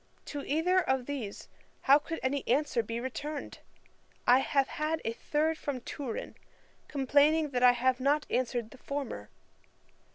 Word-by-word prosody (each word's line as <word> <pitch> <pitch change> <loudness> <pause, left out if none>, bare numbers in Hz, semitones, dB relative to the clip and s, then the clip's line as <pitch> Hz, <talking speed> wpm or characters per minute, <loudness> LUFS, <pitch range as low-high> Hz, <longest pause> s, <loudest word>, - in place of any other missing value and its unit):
To 290 - -5
either 340 +6 +2
of 265 -5 0
these 245 -8 -5 0.3
how 280 +2 +6
could 325 +2 -5
any 270 +1 0
answer 270 -1 +2
be 230 +1 -4
returned? 285 +4 -5 0.7
I 250 +1 +6
have 275 0 +1
had 310 +1 -2
a 225 - 0
third 310 +6 0
from 280 -3 -3
Turin, 250 -2 -5 0.5
complaining 290 +2 +3
that 250 -2 -1
I 250 0 +7
have 255 +1 +1
not 290 +3 +2
answered 240 -3 -1
the 265 - -14
former. 270 - -5
275 Hz, 150 wpm, -30 LUFS, 250-295 Hz, 0.7 s, I